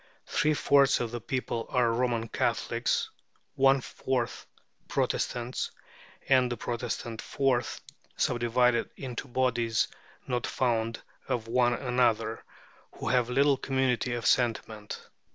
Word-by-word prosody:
Three 155 0 +1
fourths 140 -1 +4
of 120 -2 -2
the 120 -1 -4
people 120 -2 -3
are 120 -2 +2
Roman 120 -1 0
Catholics, - - 0 0.4
one 135 0 +4
fourth 125 -1 -3 0.4
Protestants, 120 +1 -1 0.6
and 130 -2 +4
this 120 - -2
Protestant 120 -1 -4
fourth 135 -3 0 0.4
subdivided 120 0 +2
into 130 0 -5
bodies 120 -3 +1 0.4
not 125 -1 -1
fond 115 -3 0 0.2
of 120 -4 -2
one 120 0 +3
another, 120 -3 +1 0.5
who - - -4
have 125 -1 +2
little 140 +2 +4
community 130 -2 0
of 115 -2 -4
sentiment. 110 -3 0
125 Hz, 115 wpm, -29 LUFS, 115-130 Hz, 0.6 s, fourths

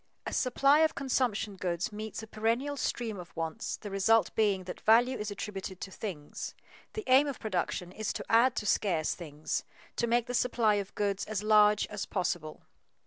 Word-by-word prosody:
A - - -4
supply 275 +3 +4
of 320 0 +3
consumption 245 -6 0
goods 180 +4 -2
meets 215 +1 -6
a - - -8
perennial 230 +7 -1
stream 230 -6 -2
of 180 - -10
wants, 165 +6 -3
the 205 - -8
result 195 +1 +3
being 205 -4 +2
that 180 - -8
value 240 +4 +5
is 210 -3 -4
attributed 195 -2 -6
to 195 - -6
things. 175 -9 -6 0.4
The 435 - -4
aim 265 +3 +5
of 280 - -4
production 180 -3 -2
is 215 +2 -3
to - - -5
add 235 +3 +4
to - - -3
scarce 175 -7 +1
things, 155 -3 -4 0.3
to 235 - +1
make 235 0 +2
the 245 - -5
supply 235 -3 +2
of 195 - -11
goods 200 -1 0
as 210 -1 -3
large 210 -1 +5
as 210 -1 -4
possible. 155 -3 -3
215 Hz, 185 wpm, -30 LUFS, 190-235 Hz, 0.4 s, value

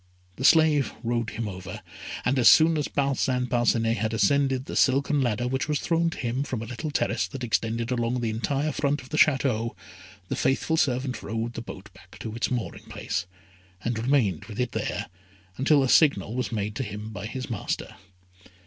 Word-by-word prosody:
The 130 - -5
slave 155 -4 +4
rowed 115 -1 -1
him 110 0 -4
over, 95 -1 -7 0.4
and 130 +2 +2
as 120 - +8
soon 160 +1 +6
as 150 -2 0
Parcin 135 -2 0
Parcinet 120 -2 +2
had 110 +1 -1
ascended 135 +1 +2
the - - -6
silken 140 +2 +3
ladder 120 -1 0
which 130 +3 -1
was 150 -1 0
thrown 165 0 +1
to - - -8
him 125 +1 -2
from 130 -5 -3
a - - -5
little 125 +7 -5
terrace 145 - 0
that 135 -3 -7
extended 115 +1 -1
along 120 0 0
the 115 -2 -1
entire 140 +7 -1
front 145 -1 -1
of 130 - -14
the 155 - -2
Château, 130 -6 +2 0.5
the - - -2
faithful 150 +4 +1
servant 130 -4 0
rowed 115 +2 -3
the 115 - -5
boat 105 -3 -10
back 90 -1 -16
to 110 - -6
its 115 - -1
mooring 125 -3 -4
place, 85 - -4 0.6
and 115 -1 -1
remained 115 - +1
with 110 0 -8
it 125 -1 0
there - - -2 0.5
until 140 +1 +4
a - - +1
signal 125 - +4
was 125 0 -2
made 105 -1 -2
to - - -1
him 105 0 -6
by 100 0 -6
his 130 +2 -5
master. 105 - -3
125 Hz, 195 wpm, -26 LUFS, 115-140 Hz, 0.6 s, as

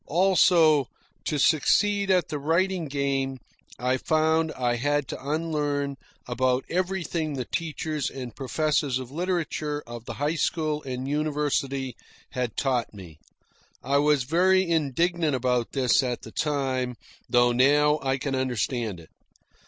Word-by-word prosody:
Also, 165 -5 +4 0.4
to 150 - -1
succeed 200 +8 +3
at 180 -4 +3
the 150 -1 -3
writing 170 +4 +1
game, 135 -1 -1 0.4
I 125 +2 0
found 160 +1 +1
I 120 -1 0
had 145 +2 0
to 135 - -6
unlearn 145 -3 -1 0.3
about 125 +1 0
everything 175 -4 -1
the 130 -3 -3
teachers 155 -2 -3
and 125 -3 -8
professors 145 -1 0
of 130 -1 -7
literature 155 -3 -2
of 120 -1 -9
the - - -6
high 145 +3 0
school 155 -3 0
and 130 -1 -5
university 140 -3 -1 0.4
had 125 -3 -3
taught 125 -5 0
me. 85 -6 -12 0.6
I 140 +2 +2
was 145 -2 +3
very 185 +6 +3
indignant 165 0 +1
about 125 -2 0
this 135 0 +3
at 125 -2 -3
the 110 - -9
time; 130 -4 -1 0.3
though 120 0 +4
now 145 +4 +4
I 135 0 0
can 135 +1 -3
understand 120 -5 -1
it. 80 - -16
145 Hz, 135 wpm, -26 LUFS, 130-160 Hz, 0.6 s, Also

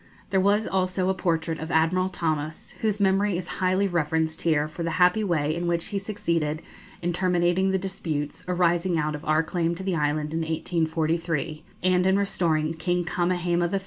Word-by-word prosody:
There 190 - +3
was 205 +3 +3
also 185 0 0
a - - +3
portrait 165 -3 -1
of 160 - -5
Admiral 175 +3 +2
Thomas, 155 -3 -3
whose 215 -2 0
memory 195 -1 +2
is 175 -2 -5
highly 185 +2 +2
reverenced 160 -2 0
here 155 -3 +2
for 155 +3 -8
the 170 - -1
happy 180 +4 +4
way 155 -5 0
in 175 +1 -2
which 170 0 0
he 200 - -1
succeeded 170 -7 -2 0.4
in 175 0 0
terminating 180 +1 +2
the 190 - +2
disputes 160 -6 -4
arising 175 -1 +2
out 155 0 0
of 150 - -6
our 155 +1 +3
claim 170 0 -1
to 190 - -7
the 190 -2 0
island 150 0 0
in 165 - 0
1843, 160 -1 -1 0.2
and 185 0 +3
in 190 +1 +4
restoring 165 -6 +1
King 175 +2 -1
Kamehameha 175 0 0
III. 195 - +2
175 Hz, 180 wpm, -26 LUFS, 160-185 Hz, 0.4 s, happy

